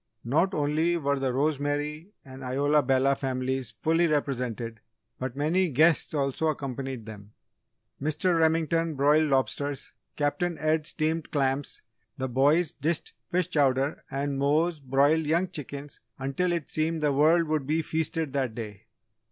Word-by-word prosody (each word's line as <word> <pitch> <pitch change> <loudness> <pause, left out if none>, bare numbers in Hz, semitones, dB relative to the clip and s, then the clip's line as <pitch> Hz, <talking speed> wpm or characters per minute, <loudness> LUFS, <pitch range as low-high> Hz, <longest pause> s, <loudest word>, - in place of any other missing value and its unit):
Not 165 - +2
only 155 +4 +1
were 140 -3 0
the 135 -1 0
Rosemary 145 +4 -1 0.2
and 135 0 -10
Isola 145 +4 +2
Bella 135 +1 +3
families 130 -2 -2
fully 165 +2 +3
represented 125 -6 -2 0.4
but 130 -1 -4
many 165 +6 +1
guests 155 +3 +3
also 140 +2 0
accompanied 135 -5 -4
them. 105 -1 -11 0.7
Mr. 155 +5 +1
Remington 165 0 +2
broiled 150 +3 +3
lobsters, 140 +1 -1 0.2
Captain 165 +4 -1
Ed 155 0 0
steamed 160 +1 -1
clams, 135 -1 -1 0.3
the 130 -1 -2
boys 145 +6 +2
dished 155 +3 -2 0.2
fish 180 -1 0
chowder 140 -1 +1
and 140 0 -2
Mose 155 +4 +2
broiled 140 +4 +2
young 170 +4 +2
chickens 145 -3 -8 0.2
until 135 +7 -1
it 170 -4 -2
seemed 155 0 -1
the 145 -1 +3
world 160 +5 +4
would 155 -3 -1
be 160 +2 +1
feasted 160 -2 -2
that 130 -5 -1
day. 105 -2 -8
145 Hz, 140 wpm, -27 LUFS, 135-160 Hz, 0.7 s, world